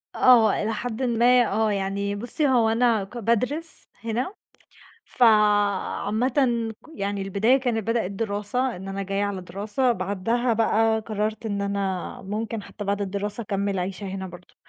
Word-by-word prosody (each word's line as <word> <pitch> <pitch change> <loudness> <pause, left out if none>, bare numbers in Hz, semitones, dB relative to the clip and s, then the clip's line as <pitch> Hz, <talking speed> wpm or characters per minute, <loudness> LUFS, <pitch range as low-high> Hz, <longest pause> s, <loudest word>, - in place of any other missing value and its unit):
آه، 235 -5 +5
إلى 220 +1 -1
حدٍ 235 +3 -4
ما 245 0 +4
آه، 215 +1 +1
يعني 200 +1 -2
بُصي 240 +8 -1
هو 240 -4 +3
أنا 225 -2 +2
ك 195 +5 -10
بادرس 250 +9 -1 0.2
هنا، 235 - -2 0.7
فعامةً 210 +1 +2 0.5
ك - - -17
يعني 200 -3 -2
البداية 200 +7 +3
كان 245 -4 0
بدأت 225 -2 -1
دراسة 210 +5 -2
إن 190 +2 -8
أنا 195 0 -3
جايّة 195 +1 -1
على 200 -2 -3
دراسة، 210 +7 -1
بعدها 230 +4 -1
بقى 225 0 +2
قررت 215 0 -3
إن 200 -2 -2
أنا 200 -2 -3
ممكن 215 +2 -4
حتّى 205 - -8
بعد 200 0 -1
الدراسة 200 +3 -3
أكمّل 200 -1 -2
عيشة 185 +2 -4
هنا 190 0 -5
برضه، 175 0 -13
210 Hz, 150 wpm, -24 LUFS, 200-235 Hz, 0.7 s, آه